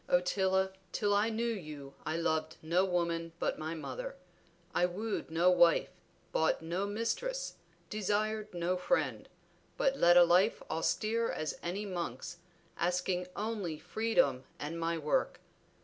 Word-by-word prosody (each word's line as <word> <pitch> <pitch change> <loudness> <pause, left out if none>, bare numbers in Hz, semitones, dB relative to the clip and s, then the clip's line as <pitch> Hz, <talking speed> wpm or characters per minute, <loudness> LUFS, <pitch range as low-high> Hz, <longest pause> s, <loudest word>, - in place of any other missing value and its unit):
"Ottila, 190 +1 +2 0.2
till 205 -1 +1
I 205 +2 +3
knew 230 +1 -1
you 155 -11 -5
I 155 +1 0
loved 160 -1 0
no 170 +4 +3
woman 170 -2 -1
but - - -1
my 160 +1 -3
mother; - - -5 0.6
I 180 - +3
wooed 210 +3 -3
no 170 +3 +4
wife, 175 -2 +5 0.4
bought 160 0 +1
no 175 +5 -1
mistress, 485 - -2 0.3
desired 215 +1 -1
no 175 +1 0
friend, 220 +9 0 0.5
but 275 0 +2
led 175 +1 +7
a 175 - +10
life 180 +5 +4
austere 220 +7 +1
as 155 -2 -3
any 190 +5 -3
monk's, 175 -4 -4 0.4
asking 180 +1 0
only 205 -7 -2
freedom 150 - +1
and 160 +3 -4
my 165 0 0
work. 150 -1 0
180 Hz, 135 wpm, -33 LUFS, 165-210 Hz, 0.6 s, a